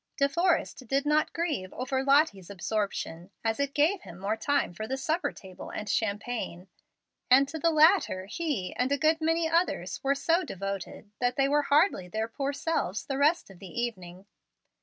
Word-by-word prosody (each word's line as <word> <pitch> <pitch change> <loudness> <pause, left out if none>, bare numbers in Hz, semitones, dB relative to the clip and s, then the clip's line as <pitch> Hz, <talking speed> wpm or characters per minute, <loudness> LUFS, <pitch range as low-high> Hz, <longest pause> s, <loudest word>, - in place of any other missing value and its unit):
De 280 - +4
Forrest 335 -4 0
did 275 +3 +1
not 300 +1 +2
grieve 305 - -2
over 260 +1 -2
Lottie's 275 - +3
absorption, 195 -3 -3 0.2
as 225 +2 0
it 280 0 -1
gave 325 +6 +3
him 170 - -11
more 200 +3 -1
time 255 -2 0
for 215 +5 -5
the 265 +2 -2
supper 315 +6 -1
table 190 -2 -11
and 210 - -6
champagne; 205 -3 -2 0.6
and 270 +2 +6
to 320 +3 -6
the 335 - +3
latter 315 - +4
he 220 - -3
and 255 +2 0
a 285 - +3
good 315 +2 +2
many 325 +1 +2
others 335 +2 0
were 275 +1 +2
so 335 +5 +2
devoted 195 - -6
that 245 0 +1
they 275 -1 +3
were 295 +1 +3
hardly 290 - +3
their 220 +5 -2
poor 275 +4 -3
selves 280 - -2
the 270 -1 -3
rest 300 - +2
of 185 - -15
the 190 +4 -7
evening. 190 -6 -5
270 Hz, 180 wpm, -28 LUFS, 200-310 Hz, 0.6 s, and